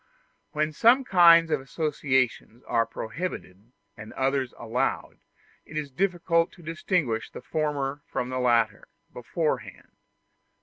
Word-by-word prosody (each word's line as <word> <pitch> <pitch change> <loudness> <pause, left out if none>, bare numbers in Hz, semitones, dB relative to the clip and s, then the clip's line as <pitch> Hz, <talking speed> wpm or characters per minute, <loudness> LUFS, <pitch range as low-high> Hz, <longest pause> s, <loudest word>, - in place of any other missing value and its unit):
When 155 +1 0
some 240 - +5
kinds 170 -6 +6
of - - +1
associations 130 -4 -1
are 115 0 0
prohibited 110 - -6 0.2
and 110 +1 -10
others 135 -1 0
allowed, 120 +1 -2 0.4
it 155 - -9
is 145 -2 -4
difficult 170 +1 +1
to 175 - -16
distinguish 160 - -1
the - - -10
former 145 -1 -2
from 125 - -3
the 130 0 -3
latter, 115 -4 +1 0.3
beforehand. 150 +6 -3
140 Hz, 120 wpm, -26 LUFS, 125-165 Hz, 0.4 s, kinds